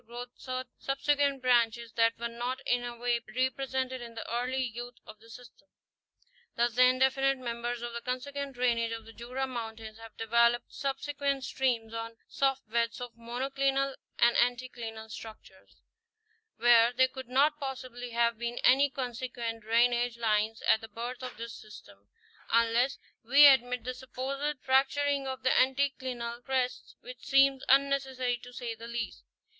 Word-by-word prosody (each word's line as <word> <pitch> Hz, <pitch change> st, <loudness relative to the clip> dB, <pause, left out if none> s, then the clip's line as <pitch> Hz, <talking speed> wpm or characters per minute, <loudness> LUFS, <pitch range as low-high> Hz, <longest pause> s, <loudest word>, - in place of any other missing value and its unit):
growth 240 Hz, +1 st, -7 dB
certain 255 Hz, -1 st, -5 dB
"subsequent" 280 Hz, 0 st, +1 dB
branches 235 Hz, -2 st, +2 dB
that 230 Hz, 0 st, +2 dB
were 235 Hz, -, -3 dB
not 240 Hz, +2 st, -3 dB
in 245 Hz, 0 st, +2 dB
any 240 Hz, -1 st, -6 dB
way 240 Hz, 0 st, 0 dB, 0.2 s
represented 260 Hz, 0 st, -1 dB
in 235 Hz, -1 st, -9 dB
the 225 Hz, -, -6 dB
early 250 Hz, +2 st, -1 dB
youth 240 Hz, +1 st, -6 dB
of 215 Hz, 0 st, -12 dB
the 225 Hz, +1 st, -18 dB
system. 245 Hz, +1 st, -14 dB, 0.9 s
Thus 240 Hz, 0 st, +1 dB
the 250 Hz, +2 st, +6 dB
indefinite 265 Hz, +1 st, +3 dB
members 240 Hz, -1 st, -4 dB
of 240 Hz, 0 st, -5 dB
the 235 Hz, -, -5 dB
consequent 275 Hz, +2 st, -4 dB
drainage 235 Hz, -2 st, +1 dB
of 225 Hz, -1 st, -7 dB
the 225 Hz, -, -13 dB
Jura 250 Hz, +4 st, -4 dB
mountains 225 Hz, -3 st, -7 dB
have 225 Hz, -1 st, -12 dB
developed 235 Hz, +1 st, +2 dB
subsequent 280 Hz, 0 st, -2 dB
streams 235 Hz, -4 st, -1 dB
on 230 Hz, 0 st, -5 dB
soft 270 Hz, -2 st, 0 dB
beds 230 Hz, +1 st, 0 dB
of 245 Hz, -1 st, -7 dB
monoclinal 270 Hz, +3 st, -1 dB, 0.2 s
and 235 Hz, 0 st, +4 dB
anticlinal 240 Hz, -3 st, -2 dB
structures, 215 Hz, -3 st, -12 dB, 0.7 s
where 235 Hz, 0 st, +6 dB
there 260 Hz, +1 st, +4 dB
could 260 Hz, -1 st, -9 dB
not 290 Hz, +4 st, +3 dB
possibly 255 Hz, -3 st, -6 dB
have 235 Hz, -1 st, +1 dB
been 235 Hz, 0 st, -3 dB
any 275 Hz, +3 st, +5 dB
consequent 245 Hz, -3 st, -4 dB
drainage 240 Hz, +2 st, +2 dB
lines 220 Hz, -1 st, 0 dB
at 220 Hz, -, +4 dB
the 225 Hz, -, -8 dB
birth 235 Hz, +3 st, -6 dB
of 255 Hz, -3 st, -7 dB
this 230 Hz, +1 st, -6 dB
system, 100 Hz, -, -14 dB, 0.4 s
unless 230 Hz, +3 st, +3 dB, 0.3 s
we 275 Hz, +6 st, +7 dB
admit 250 Hz, -3 st, +5 dB
the 255 Hz, -, -3 dB
supposed 270 Hz, +3 st, -4 dB
fracturing 275 Hz, +1 st, +2 dB
of 260 Hz, -1 st, -5 dB
the 260 Hz, -, +3 dB
anti 270 Hz, +2 st, +3 dB
clinal 240 Hz, -2 st, -6 dB
crests, 255 Hz, -1 st, -2 dB
which -, -, -10 dB
seems 275 Hz, -1 st, +4 dB
unnecessary 265 Hz, -2 st, +2 dB
to 245 Hz, -, -11 dB
say 245 Hz, -2 st, -5 dB
the 230 Hz, +1 st, -10 dB
least. 235 Hz, 0 st, -5 dB
245 Hz, 155 wpm, -30 LUFS, 235-265 Hz, 0.9 s, we